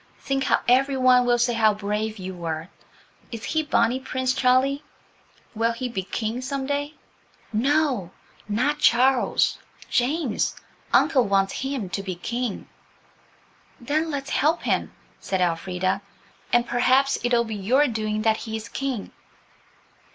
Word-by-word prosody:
Think 270 -1 -2
how - - +2
every 265 +2 +3
one 250 -1 +5
will 240 0 +4
say 240 0 +2
how 220 -2 +3
brave 210 +2 -2
you 190 -1 -6
were. 165 -1 -5 0.6
Is 230 -1 -7
he 315 - 0
Bonnie 260 -4 +1
Prince 260 -1 -1
Charlie? 260 +2 +2 0.7
Will 230 +1 +1
he 250 +2 -4
be 220 -5 -3
King 220 +5 -3
some 270 +1 -3
day?" 285 +2 -2 0.6
"No, 265 - +1 0.4
not 255 +8 0
Charles–James; 255 +1 +1 0.4
uncle 255 -4 +4
wants 195 -1 +2
him 265 -6 -3
to 195 - -2
be 190 -2 -5
King." 235 +4 -4 1.1
"Then 305 +6 -1
let's 275 -2 -4
help 315 +4 +1
him," - - 0 0.3
said 190 - -2
Elfrida, 180 +2 0 0.5
"and 240 0 +3
perhaps 260 +3 +2
it'll 240 -1 +3
be 225 -1 -6
your 250 +9 +3
doing 215 -2 -2
that 220 -1 +3
he 220 -1 -5
is 220 +1 -6
King." 270 -6 -4
240 Hz, 135 wpm, -24 LUFS, 210-270 Hz, 1.1 s, one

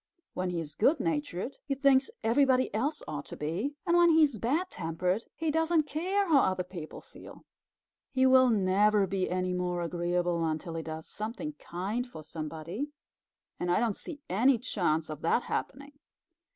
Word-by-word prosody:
When 185 0 -2
he 175 -1 -2
is 155 -2 -5
good 280 +8 +3
natured, 290 - -2
he 275 - -2
thinks 270 -1 +4
everybody 255 +2 +3
else 275 +9 -1
ought 145 -2 -5
to - - -8
be; 185 - -2
and 340 - +3
when 345 0 +6
he 320 -1 +6
is 280 -8 +1
bad 305 - 0
tempered 180 +6 -2
he 320 -1 -1
doesn't 325 +1 +2
care 370 +7 -1
how 305 -5 +5
other 185 -6 +1
people 175 -3 -8
feel. - - -14 0.7
He 260 -1 +3
will 260 -1 +6
never 205 0 +3
be 190 0 -1
any 185 0 -1
more 180 -1 -1
agreeable 175 0 0
until 160 +1 -2
he 165 - -3
does 160 0 -6
something 230 +8 -5
kind 205 +8 -3
for 160 -10 -10
somebody, 160 - -5 0.7
and 175 - -2
I 175 - +3
don't 225 -3 +1
see 295 -3 -8
any 240 +8 +3
chance 175 -10 0
of 155 0 -7
that 200 +8 +2
happening." 280 +2 -5
210 Hz, 175 wpm, -30 LUFS, 175-280 Hz, 0.7 s, when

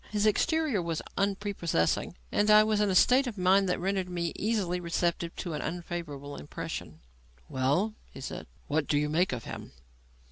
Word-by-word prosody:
His 210 0 0
exterior 300 - +2
was 165 -2 -3
unprepossessing, 195 - 0 0.2
and 210 +1 +2
I 210 0 +8
was 215 -1 +1
in 205 - +3
a 190 - +1
state 255 +7 +5
of 225 -4 -5
mind 190 +1 +4
that 180 - 0
rendered 190 0 -1
me 170 -2 -2
easily 200 -5 0
receptive 170 0 -1
of 175 - -3
an 150 - -3
unfavourable 165 -5 -5
impression. 75 - -6 0.5
"Well," 145 - +1 0.2
he - - -10
said, 135 - -6 0.2
"what 150 0 0
do 145 - +2
you 150 0 +1
make 170 +5 +2
of 120 -3 -4
him?" - - -8
180 Hz, 175 wpm, -29 LUFS, 165-205 Hz, 0.5 s, I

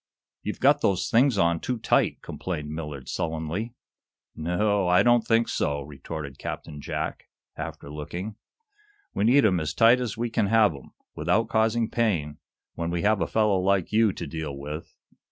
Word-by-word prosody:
"You've 105 - -5
got 145 +2 +4
those 95 -3 +1
things 125 0 +4
on 85 -2 +2
too 125 +7 -2
tight," - - +1
complained 75 -5 -5
Millard, 75 -4 -6
sullenly. 80 +9 -3 0.6
"No 85 +3 -2
o 105 -2 +2
o, - - 0
I 90 +3 +5
don't 120 0 +5
think 115 +1 +2
so," 70 0 -1
retorted 70 0 -8
Captain 75 -2 -6
Jack, - - -4 0.3
after - - -7
looking. 85 +8 -6 0.8
"We 100 - 0
need 130 +2 +5
'em 95 -4 +3
as 80 -1 -3
tight 120 +2 +6
as 115 -4 -3
we 120 0 -2
can 105 - +1
have 110 -3 +4
'em, 70 - -13 0.2
without 115 +2 +1
causing 110 +1 +2
pain, 90 -12 -1 0.3
when 85 0 -3
we 85 0 -2
have 105 -2 +3
a 85 - +1
fellow 105 -3 +2
like 95 -1 +1
you 110 -1 +4
to 85 - -6
deal 75 -2 -5
with. 75 +3 -7
95 Hz, 175 wpm, -26 LUFS, 80-110 Hz, 0.8 s, tight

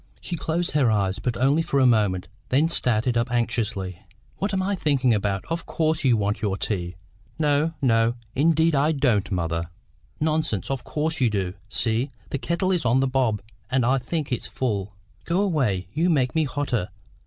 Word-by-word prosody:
She 175 - -4
closed 170 +2 -1
her 140 -5 +3
eyes, 100 -3 +1
but 125 -2 -2
only 140 +6 +3
for 140 -3 0
a 130 - +5
moment, 105 -7 +2 0.2
then 145 +5 +3
started 120 -6 +1
up 115 +1 0
anxiously. 110 -6 -1 0.4
"What 200 - -1
am 190 -1 0
I 200 +2 0
thinking 140 -9 +2
about! 100 -2 -1
Of 165 0 -3
course 160 -1 0
you 125 -4 +4
want 105 0 -1
your 100 -3 0
tea." 90 -5 -3 0.4
"No, 155 +1 +1
no; 115 -1 +3 0.2
indeed 160 +3 +3
I 150 +3 +3
don't, 120 -9 +1
mother." 85 -2 -1 0.5
"Nonsense; 155 - 0
of 135 -2 -2
course 150 +3 -2
you 125 - +4
do. 95 -4 -1 0.2
See, 115 +4 +1 0.2
the 140 - -1
kettle 180 +5 0
is 175 -4 +1
on 125 +2 +3
the 135 0 +2
hob, 115 -7 +1 0.3
and 130 -2 +2
I 135 +2 +3
think 145 +3 -3
it's 125 - -2
full. 100 -6 -2 0.3
Go 170 +2 0
away; 125 - 0
you 170 +3 +2
make 130 -6 +2
me 160 -1 +2
hotter. 130 -8 -2
130 Hz, 185 wpm, -24 LUFS, 105-155 Hz, 0.5 s, a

